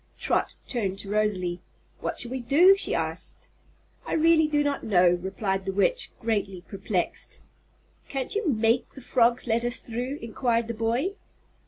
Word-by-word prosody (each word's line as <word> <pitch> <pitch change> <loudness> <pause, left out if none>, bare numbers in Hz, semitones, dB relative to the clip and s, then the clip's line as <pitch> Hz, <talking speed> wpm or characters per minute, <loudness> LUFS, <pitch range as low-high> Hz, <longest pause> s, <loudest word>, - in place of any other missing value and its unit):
Trot - - 0
turned 200 -6 -2
to 195 0 -7
Rosalie. 185 -5 0 0.4
"What - - -3
shall 240 - +2
we 260 - -2
do?" 330 +11 +6
she 395 - +1
asked. - - -4 0.5
"I - - -4
really 320 0 +4
do 295 -1 +1
not 285 -1 -1
know," 180 -4 +4
replied 190 0 -2
the 195 - -2
Witch, 205 - +2
greatly 205 -5 -2
perplexed. 190 -1 -3 0.7
"Can't 270 -2 -2
you 425 -2 -1
make 230 0 +2
the - - -12
frogs 240 0 +2
let 235 0 +1
us 240 0 0
through?" 250 +4 -4
inquired 230 0 -1
the 235 - -3
boy. 230 - -1
230 Hz, 160 wpm, -26 LUFS, 200-270 Hz, 0.7 s, do